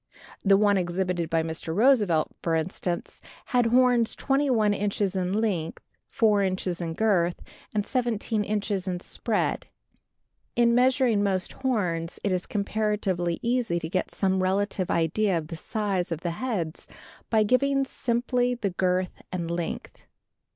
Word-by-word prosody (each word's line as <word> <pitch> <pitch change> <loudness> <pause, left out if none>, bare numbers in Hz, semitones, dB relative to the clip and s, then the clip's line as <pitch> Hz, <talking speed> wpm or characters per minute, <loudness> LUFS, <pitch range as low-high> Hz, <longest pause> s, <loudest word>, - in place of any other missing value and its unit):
The 195 -1 +5
one 205 -1 +3
exhibited 175 -1 -1
by 165 -1 +1
Mr. 160 0 -4
Roosevelt, 210 - +3
for 165 -1 0
instance, 175 +2 -3 0.2
had 245 -3 +2
horns 245 -1 +3
21 260 -7 +2
inches 200 -1 -1
in 185 -1 -1
length, 195 -6 -1 0.3
4 210 -3 +3
inches 185 -2 -1
in 165 -1 -3
girth 180 -5 +2 0.4
and 205 -1 +1
17 225 -3 -1
inches 205 -2 -2
in 180 -1 -2
spread. - - -2 0.9
In 235 -1 +4
measuring 250 -3 +3
most 190 -3 0
horns 180 -10 -1
it 200 - +1
is 180 -1 -1
comparatively 200 -4 -1
easy 235 -6 +1
to 160 -1 -4
get 185 +1 -1
some 190 -1 0
relative 190 0 0
idea 170 +4 +1
of 155 -1 -5
the 165 - -5
size 195 0 -2
of 165 -1 -3
the 170 - -2
heads 175 -5 -3 0.4
by 220 -2 +4
giving 275 +4 +2
simply 245 0 0
the 205 -5 -2
girth 180 0 -1
and 170 -2 -3
length. 170 -1 -5
200 Hz, 145 wpm, -26 LUFS, 175-225 Hz, 0.9 s, The